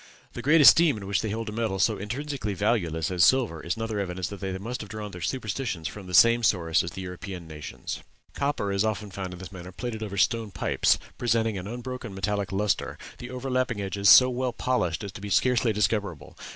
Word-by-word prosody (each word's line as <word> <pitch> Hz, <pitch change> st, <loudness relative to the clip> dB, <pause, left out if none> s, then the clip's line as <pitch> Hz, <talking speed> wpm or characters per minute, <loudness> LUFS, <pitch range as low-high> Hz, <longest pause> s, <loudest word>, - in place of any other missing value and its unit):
The -, -, -6 dB
great 155 Hz, +3 st, +5 dB
esteem 155 Hz, -1 st, +7 dB
in 100 Hz, -, -8 dB
which 100 Hz, 0 st, 0 dB
they 110 Hz, -, -3 dB
held 115 Hz, +2 st, -3 dB
a -, -, -5 dB
metal 110 Hz, -3 st, -2 dB
so 105 Hz, +1 st, +2 dB
intrinsically 120 Hz, 0 st, -4 dB
valueless 90 Hz, -6 st, 0 dB
as 90 Hz, -2 st, +3 dB
silver, 115 Hz, -12 st, +3 dB
is 85 Hz, -, -2 dB
another 115 Hz, -2 st, -3 dB
evidence 95 Hz, -2 st, -3 dB
that 100 Hz, -, -8 dB
they 95 Hz, -1 st, -3 dB
must 120 Hz, +6 st, -5 dB
have 105 Hz, -, -9 dB
drawn 105 Hz, 0 st, -6 dB
their 90 Hz, -2 st, -9 dB
superstitions 110 Hz, -7 st, -3 dB
from 100 Hz, -3 st, -9 dB
the 90 Hz, -, -2 dB
same 115 Hz, +3 st, +6 dB
source 85 Hz, -7 st, +2 dB
as 85 Hz, -, -4 dB
the 95 Hz, +4 st, -7 dB
European 90 Hz, -1 st, -7 dB
nations. 75 Hz, -2 st, -7 dB, 0.3 s
Copper 140 Hz, -8 st, -1 dB
is 100 Hz, +1 st, +1 dB
also 110 Hz, -2 st, 0 dB
often 100 Hz, -, -11 dB
found 95 Hz, 0 st, -5 dB
in -, -, -9 dB
this 90 Hz, -1 st, -9 dB
manner 90 Hz, -1 st, -9 dB
plated 110 Hz, +3 st, -5 dB
over 100 Hz, -2 st, -5 dB
stone 110 Hz, +3 st, +1 dB
pipes, 85 Hz, -5 st, +1 dB, 0.2 s
presenting 115 Hz, -2 st, +1 dB
an 95 Hz, 0 st, -5 dB
unbroken 120 Hz, -2 st, -6 dB
metallic 100 Hz, 0 st, -2 dB
lustre, 100 Hz, +1 st, -1 dB, 0.2 s
the 120 Hz, -, -7 dB
overlapping 130 Hz, -2 st, -1 dB
edges 100 Hz, 0 st, +1 dB
so 125 Hz, -, +9 dB
well 125 Hz, 0 st, -2 dB
polished 100 Hz, -10 st, -1 dB
as 100 Hz, -, -5 dB
to 95 Hz, -, -10 dB
be 100 Hz, -, -6 dB
scarcely 120 Hz, +3 st, +3 dB
discoverable. 105 Hz, -6 st, -1 dB
105 Hz, 220 wpm, -26 LUFS, 95-120 Hz, 0.3 s, so